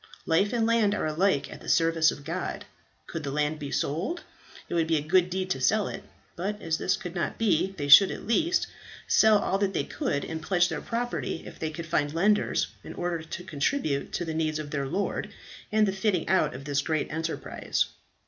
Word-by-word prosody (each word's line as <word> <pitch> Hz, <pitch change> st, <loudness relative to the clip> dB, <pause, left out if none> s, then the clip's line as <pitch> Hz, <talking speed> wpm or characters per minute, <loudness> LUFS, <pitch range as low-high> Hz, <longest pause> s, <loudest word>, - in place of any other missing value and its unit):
Life 185 Hz, +5 st, +2 dB
and 235 Hz, -2 st, +1 dB
land 225 Hz, -3 st, +3 dB
are -, -, -1 dB
alike 155 Hz, 0 st, +1 dB
at -, -, -12 dB
the -, -, -7 dB
service 165 Hz, -1 st, +4 dB
of 145 Hz, -, -5 dB
God. -, -, -4 dB, 0.4 s
Could 165 Hz, -, -5 dB
the 145 Hz, -, -4 dB
land 150 Hz, +2 st, -1 dB
be 145 Hz, -2 st, -5 dB
sold, 180 Hz, -, -2 dB, 0.4 s
it -, -, -6 dB
would 165 Hz, -2 st, +2 dB
be 160 Hz, -1 st, +2 dB
a -, -, 0 dB
good 180 Hz, +3 st, +3 dB
deed 185 Hz, 0 st, -2 dB
to 130 Hz, -, -1 dB
sell 210 Hz, +10 st, +3 dB
it; -, -, -6 dB, 0.3 s
but 205 Hz, +4 st, -3 dB
as 160 Hz, -3 st, -2 dB
this 185 Hz, -, +1 dB
could 180 Hz, -5 st, -7 dB
not 170 Hz, -3 st, -2 dB
be, 195 Hz, -3 st, +1 dB
they 145 Hz, -2 st, -3 dB
should 185 Hz, +7 st, +9 dB
at -, -, -6 dB
least 335 Hz, +11 st, +2 dB, 0.4 s
sell 220 Hz, -1 st, +6 dB
all 195 Hz, -1 st, 0 dB
that 195 Hz, -1 st, 0 dB
they -, -, +1 dB
could, 140 Hz, 0 st, -2 dB
and 160 Hz, 0 st, -5 dB
pledge 180 Hz, -1 st, +2 dB
their 160 Hz, -2 st, -3 dB
property 240 Hz, -6 st, -3 dB
if -, -, -11 dB
they 160 Hz, -, -2 dB
could 165 Hz, +2 st, -6 dB
find 150 Hz, -2 st, 0 dB
lenders, 205 Hz, +5 st, +2 dB, 0.2 s
in -, -, -9 dB
order 175 Hz, -2 st, -2 dB
to 160 Hz, +2 st, -7 dB
contribute 150 Hz, -, -1 dB
to 175 Hz, -, -2 dB
the 160 Hz, -, -3 dB
needs 155 Hz, -1 st, 0 dB
of 150 Hz, -1 st, -6 dB
their 140 Hz, -2 st, -2 dB
lord, 200 Hz, +9 st, -2 dB, 0.4 s
and 215 Hz, 0 st, +4 dB
the -, -, +1 dB
fitting 190 Hz, -3 st, 0 dB
out 190 Hz, -7 st, +2 dB
of 135 Hz, +2 st, -8 dB
this 140 Hz, -1 st, +1 dB
great 155 Hz, +1 st, -1 dB
enterprise. 160 Hz, +1 st, -2 dB
165 Hz, 215 wpm, -27 LUFS, 155-200 Hz, 0.4 s, should